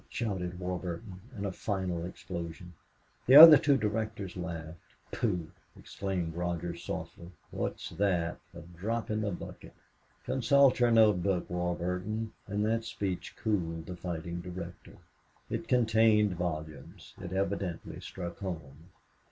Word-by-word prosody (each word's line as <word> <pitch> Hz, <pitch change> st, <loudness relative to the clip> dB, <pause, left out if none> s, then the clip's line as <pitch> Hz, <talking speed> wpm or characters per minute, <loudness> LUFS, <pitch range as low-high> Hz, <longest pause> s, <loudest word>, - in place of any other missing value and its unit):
shouted 90 Hz, -6 st, -3 dB
Warburton, 90 Hz, +2 st, -5 dB, 0.2 s
in 100 Hz, -, -3 dB
a 100 Hz, -, -1 dB
final 95 Hz, -3 st, -2 dB
explosion. 85 Hz, -1 st, -7 dB, 0.5 s
The 130 Hz, -, +7 dB
other 155 Hz, -1 st, +13 dB
two 145 Hz, -3 st, +3 dB
directors 105 Hz, -3 st, -3 dB
laughed. 85 Hz, -2 st, -6 dB, 0.3 s
"Pooh!" 90 Hz, -8 st, -1 dB, 0.3 s
exclaimed 90 Hz, -4 st, -4 dB
Rogers, 85 Hz, 0 st, -3 dB
softly. 85 Hz, -, -6 dB, 0.2 s
"What -, -, -2 dB
is -, -, -9 dB
that? 90 Hz, -4 st, +1 dB, 0.2 s
A 85 Hz, -, -8 dB
drop 100 Hz, +8 st, -4 dB
in 110 Hz, 0 st, 0 dB
the 105 Hz, -, -1 dB
bucket! 90 Hz, -, -8 dB, 0.5 s
Consult 135 Hz, +1 st, +4 dB
your 120 Hz, -1 st, +4 dB
note 110 Hz, -5 st, +5 dB
book, 95 Hz, -2 st, 0 dB
Warburton." 90 Hz, +5 st, -2 dB
And 105 Hz, +1 st, -1 dB
that 115 Hz, +1 st, 0 dB
speech 95 Hz, -5 st, -4 dB
cooled 85 Hz, -7 st, -1 dB
the 90 Hz, -, -6 dB
fighting 85 Hz, -1 st, -5 dB
director. 90 Hz, -1 st, -8 dB, 0.5 s
It -, -, -3 dB
contained 110 Hz, -4 st, +4 dB
volumes. 80 Hz, -4 st, -6 dB
It 90 Hz, -1 st, -6 dB
evidently 95 Hz, -2 st, -3 dB
struck 85 Hz, -2 st, -7 dB
home. 80 Hz, -4 st, -7 dB
90 Hz, 130 wpm, -30 LUFS, 85-105 Hz, 0.5 s, other